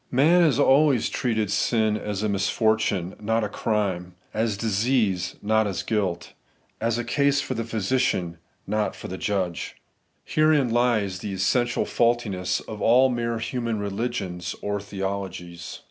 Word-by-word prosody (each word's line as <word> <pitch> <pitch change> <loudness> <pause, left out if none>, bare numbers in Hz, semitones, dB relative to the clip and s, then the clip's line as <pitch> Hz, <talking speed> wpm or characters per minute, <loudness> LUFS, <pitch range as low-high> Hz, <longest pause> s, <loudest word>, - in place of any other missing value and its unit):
3 - - -7
Man 165 +6 +6
has 155 -6 +4
always 140 -2 +4
treated 110 -5 -1
sin 110 0 +2
as 105 -1 -3
a - - +1
misfortune^ 100 -2 0
not 115 +2 +1
a - - 0
crime; 95 -5 -2 0.2
as 110 -2 0
disease^ 105 -3 0
not 110 +1 +2
as 100 - -3
guilt; 95 -6 -2 0.5
as 115 +1 0
a 120 - -1
case 140 +2 +2
for 130 - -2
the 115 -1 -2
physician, 110 -6 -1 0.3
not 105 +1 -1
for - - -8
the 95 - -6
judga 95 -4 -1 0.7
Herein 155 -5 +3
lies 110 -6 +1
the 100 0 -5
essential 120 +6 +1
faultiness 100 -6 0
of 105 -1 -8
all 130 +3 +5
mere 115 -1 -1
human 115 0 -2
religions 100 -3 -3
or 105 0 -2
theologies. 95 -4 -5
110 Hz, 145 wpm, -25 LUFS, 95-120 Hz, 0.7 s, Man